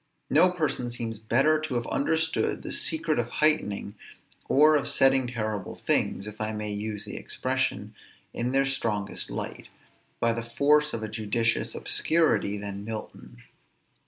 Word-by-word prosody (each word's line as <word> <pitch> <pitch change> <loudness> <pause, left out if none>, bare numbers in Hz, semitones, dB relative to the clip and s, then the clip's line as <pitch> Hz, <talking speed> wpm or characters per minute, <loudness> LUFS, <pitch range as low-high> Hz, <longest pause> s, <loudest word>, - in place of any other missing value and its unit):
No 185 - +6
person 155 -8 -2
seems 115 -2 -5
better 135 +8 +3
to 155 -5 -3
have 120 -1 -1
understood 160 +5 0
the - - -5
secret 160 -3 0
of 120 - 0
heightening, 120 -8 +1 0.6
or 155 +2 +6
of 145 - +1
setting 135 -1 +3
terrible 110 -5 -4
things, 95 - 0
if 105 +1 -8
I 110 0 -1
may 105 0 -3
use 105 0 -4
the - - -7
expression, - - -2 0.4
in 120 +1 -2
their 135 +1 +3
strongest 115 -7 -2
light, - - -5 0.5
by 115 0 +2
the 115 - -3
force 150 +5 +2
of 110 - -5
a - - -2
judicious 110 +2 -1
obscurity 115 -11 +2
than 100 0 -6
Milton. 110 0 -8
120 Hz, 150 wpm, -27 LUFS, 110-150 Hz, 0.6 s, No